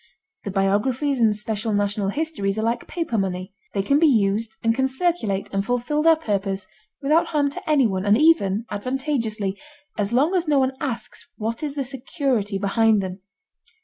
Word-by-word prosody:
The - - -2
biographies 230 +8 +1
and 220 -2 +4
special 215 +1 -2
national 205 -1 0
histories 210 -7 -2
are 220 - -1
like 235 +1 -1
paper 325 -11 -2
money. 185 0 -3 0.2
They 195 - +1
can 280 +8 +3
be 325 - +5
used 215 -3 +1
and 230 0 +3
can 265 +2 +1
circulate 265 - -1
and 195 0 +1
fulfill 245 +7 0
their 325 +1 +6
purpose 200 -9 -2 0.4
without 310 +4 +3
harm 290 -3 +1
to 285 - -8
anyone 230 -11 +2
and 205 +1 +5
even 235 - +3
advantageously, 225 -4 -2 0.4
as 205 +1 0
long 280 +9 +3
as 355 -3 +1
no 295 -2 +3
one 265 0 +2
asks 260 -6 -5
what 225 +2 -3
is 295 -2 -3
the 280 - -1
security 250 - -1
behind 210 +1 +2
them. 185 +1 -5
230 Hz, 175 wpm, -23 LUFS, 200-280 Hz, 0.4 s, their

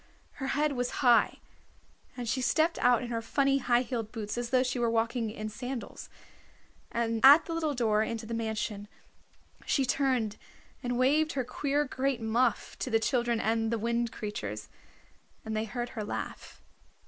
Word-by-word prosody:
Her 265 - -1
head 300 0 +2
was 250 0 -2
high, 240 -1 +5 0.8
and 245 -1 -4
she 255 +4 0
stepped 320 +6 +2
out 245 -1 +4
in 240 - -5
her 230 -1 -2
funny 275 +4 +2
high 245 -1 +2
heeled 230 -3 -4
boots 210 -3 -4
as 240 0 -3
though 255 0 +3
she 250 -1 -2
were 235 -1 +2
walking 230 0 0
in 215 0 -5
sandals. 245 +4 -6 0.8
At 235 +6 +6
the 335 - -4
little 315 -3 -1
door 220 -3 +2
into 225 0 -3
the 230 - -5
mansion 220 -2 -3 0.8
she 275 - +2
turned 250 -5 0 0.4
and 245 0 -2
waved 300 +5 +3
her 265 - -1
queer 285 +4 -1
great 265 -1 -1
muff 230 +1 0
to - - -2
the 225 -2 +3
children 240 -1 +1
and 225 0 0
the 230 - +1
Wind 235 +1 -1
Creatures, 105 - -5 0.8
and 220 0 -3
they 215 +1 0
heard 240 +2 -4
her 220 -4 -5
laugh. 205 - -6
240 Hz, 170 wpm, -30 LUFS, 225-260 Hz, 0.8 s, At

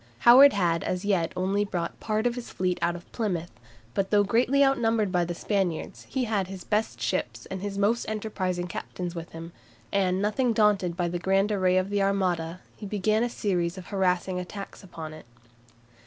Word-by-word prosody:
Howard 265 +4 +9
had 170 -4 +1
as 180 +1 -2
yet 180 -5 +1
only 195 +3 +1
brought 180 -4 -4
part 215 +1 -1
of 240 - +2
his 245 -1 -7
fleet 180 -1 -1
out 170 - +1
of 175 - -11
Plymouth, 180 -7 -2 0.4
but 195 +6 0
though 205 -1 +4
greatly 250 +7 +3
outnumbered 225 -6 +2
by 180 -2 +2
the 175 0 -3
Spaniards, 190 -3 -2
he 265 - -1
had 210 -5 0
his 190 -1 -8
best 210 - -1
ships 115 -1 -2
and 190 -1 -4
his 200 0 -4
most 215 +4 +1
enterprising 190 -5 -2
captains 175 0 -5
with 170 -1 -7
him, 165 +1 -9 0.4
and 185 -2 +1
nothing 220 +4 +1
daunted 200 -5 +2
by 175 -1 0
the 175 +1 -3
grand 195 +3 +2
array 185 -2 +2
of 185 +2 0
the 205 -1 +1
Armada, 180 -3 0
he 210 - -8
began 215 +2 +1
a 240 - +1
series 180 -5 -1
of 185 - -8
harassing 185 -1 0
attacks 195 +2 -7
upon 160 -4 -8
it. 155 -5 -12
190 Hz, 190 wpm, -27 LUFS, 175-210 Hz, 0.4 s, Howard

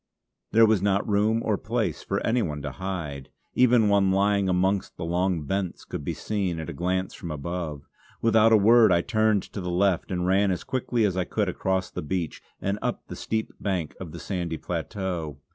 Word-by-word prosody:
There 115 0 +7
was 110 -3 +3
not 100 0 +1
room 110 +2 +2
or 105 -3 +1
place - - -2
for - - -2
any 120 +2 +2
one 75 -7 -3
to 75 - -3
hide; 80 -7 -5 0.2
even 120 -3 +5
one 100 -1 +4
lying 100 0 +2
amongst 95 +2 0
the 85 - -4
long 90 -1 0
bents 95 +3 -3
could - - -6
be - - -3
seen 95 -6 -2
at 80 +2 -5
a - - -7
glance 90 +4 -1
from 85 - -7
above. 75 -1 -5 0.3
Without 115 0 +4
a 110 - +8
word 110 +1 +6
I 85 -1 +4
turned 110 -2 +2
to 100 - -7
the 90 - -3
left 90 0 +1
and 90 -1 -1
ran 95 +2 +3
as 90 - -1
quickly 120 -3 0
as 95 -3 0
I 90 -1 0
could - - -1
across 95 -1 -1
the - - -4
beach 85 +1 -3 0.2
and 100 +2 -2
up - - -3
the - - -6
steep 110 0 -3
bank 90 -6 -2
of 85 -4 -7
the - - -8
sandy 85 -4 -3
plateau. 85 -3 -4
95 Hz, 205 wpm, -26 LUFS, 85-105 Hz, 0.3 s, a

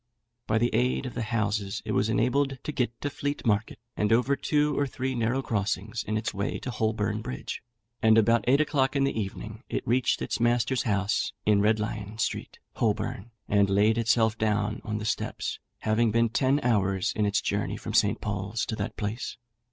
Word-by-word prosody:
By 110 - +2
the 120 +2 +1
aid 125 +4 +1
of 125 - -5
the - - -3
houses 105 -3 -1
it - - -2
was 105 - +2
enabled 135 +5 +1
to - - -3
get 120 -5 -2
to 145 - -1
Fleet 145 +1 -3
Market, 105 -1 +1 0.2
and 105 +1 +1
over 125 +4 +3
two 150 +1 +1
or 145 - +1
three 130 0 -3
narrow 120 +2 0
crossings 105 0 -2
in 110 - -1
its 110 -1 -2
way 100 +1 -2
to 125 - -4
Holborn 110 -1 -1
Bridge, 65 - -5 0.4
and 110 0 +5
about 115 0 +4
eight 135 +3 +5
o'clock 145 -3 +1
in 140 - +3
the 135 - +1
evening 110 +1 -5
it - - -3
reached 125 +1 +2
its - - -2
master's 120 +1 +2
house 100 -3 0
in 105 -1 +4
Red 110 +1 +3
Lion 105 0 -4
Street, - - -2 0.2
Holborn, 120 - -1 0.2
and 100 -1 +3
laid 105 +3 +3
itself 115 -1 +3
down 110 0 0
on 105 0 -3
the 105 - -4
steps, - - -2 0.2
having 110 +2 +2
been 115 +1 +2
ten 135 +4 +2
hours 95 -5 +1
in 105 -1 +2
its 100 - +2
journey - - -1
from - - -6
St. - - +3
Paul's 100 +2 -2
to 110 - -3
that - - -4
place. 105 +3 -3
110 Hz, 195 wpm, -27 LUFS, 105-125 Hz, 0.4 s, and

